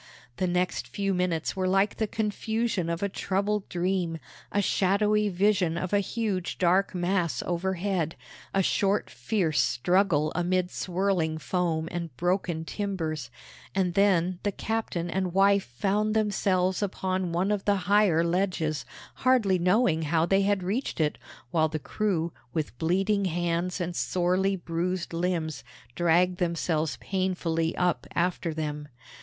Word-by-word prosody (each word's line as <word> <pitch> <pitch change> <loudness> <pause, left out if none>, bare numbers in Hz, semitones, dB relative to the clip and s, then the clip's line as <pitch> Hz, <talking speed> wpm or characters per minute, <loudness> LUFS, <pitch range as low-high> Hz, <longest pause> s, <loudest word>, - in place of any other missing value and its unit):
The 185 - 0
next 180 +1 0
few 195 -1 -1
minutes 180 -2 -1
were 185 -1 0
like 195 +2 +2
the 220 - 0
confusion 220 -3 -1
of 170 +3 -2
a - - +2
troubled 200 +1 -1
dream 175 -2 -1 0.3
a 205 - +1
shadowy 210 +2 +2
vision 185 -3 +2
of 185 +2 -3
a 205 - +5
huge 200 -2 -2
dark 185 +2 +2
mass 175 -7 0
overhead, 180 -1 -1 0.4
a 195 - +2
short 200 +2 +1
fierce 160 - 0
struggle 165 +2 +2
amid 180 +1 0
swirling 180 -3 0
foam 165 -1 -1
and 170 -7 -5
broken 175 -2 0
timbers 160 - -3 0.5
and 185 -2 +1
then 185 -2 +2
the 205 - 0
captain 215 -5 -2
and 185 0 -2
wife 200 0 +4
found 205 - 0
themselves 190 -3 +1
upon 185 -2 -1
one 180 +4 +1
of 205 -2 -1
the 205 - +3
higher 200 -4 +4
ledges, 170 -4 0 0.3
hardly 230 -8 +3
knowing 180 -2 +3
how 160 +1 +2
they 195 +3 +3
had 200 -1 +1
reached 210 +6 -2
it, 150 -1 0 0.3
while 160 -2 +2
the 155 - -2
crew, 170 0 -1 0.2
with 155 -6 -2
bleeding 195 +4 +1
hands 175 +1 -1
and 175 -1 -3
sorely 185 +3 +1
bruised 175 0 -3
limbs, 165 -4 -1 0.3
dragged 175 +4 +2
themselves 165 -3 0
painfully 175 -4 -1
up 180 -1 0
after 175 -1 0
them. 150 -1 -4
180 Hz, 140 wpm, -27 LUFS, 170-195 Hz, 0.5 s, a